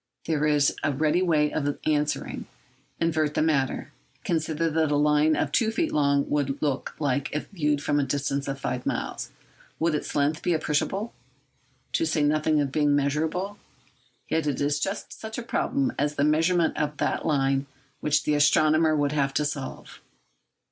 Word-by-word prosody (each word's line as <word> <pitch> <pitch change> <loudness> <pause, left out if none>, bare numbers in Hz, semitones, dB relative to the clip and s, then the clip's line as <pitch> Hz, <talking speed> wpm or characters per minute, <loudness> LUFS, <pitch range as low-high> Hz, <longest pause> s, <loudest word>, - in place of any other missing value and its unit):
There 150 -2 +1
is 145 -2 +3
a - - +2
ready 155 +5 +1
way 155 -5 +2
of 145 -1 -1
answering. 150 -1 -1 0.5
Invert 155 -3 0
the - - +2
matter. 140 -4 0 0.3
Consider 160 0 0
what 160 -1 +1
a - - +3
line 150 +1 +3
of - - -1
two 225 -3 +2
feet 280 +9 -1
long 140 -1 +2
would 140 -1 -1
look 145 -3 -2
like 140 -2 0
if 150 - -3
viewed 150 -6 0
from 145 0 +1
a - - +2
distance 140 +1 -2
of 135 0 -3
five 125 -2 -3
miles. - - -3 0.5
Would 165 0 +1
its 150 - -3
length 145 +2 +1
be 175 - +1
appreciable, 175 +8 -1 0.8
to 330 - +2
say 150 - +1
nothing 155 +1 +2
of 140 -1 0
its - - -17
being 145 -2 +3
measurable? 160 +8 -1 0.7
Yet 160 -1 0
it 145 - -1
is 145 +1 +1
just 195 +5 -3
such 220 0 -7
a 240 - -4
problem 265 +2 0
as 145 +1 0
the 140 - +1
measurement 165 +3 +2
of 150 -1 -1
that - - -1
line 135 -3 +1 0.3
which 150 0 +1
the 150 - +1
astronomer 155 +2 +4
would 145 -1 +1
have 140 -2 0
to 150 - +1
solve. 145 -2 -6
150 Hz, 175 wpm, -26 LUFS, 145-160 Hz, 0.8 s, astronomer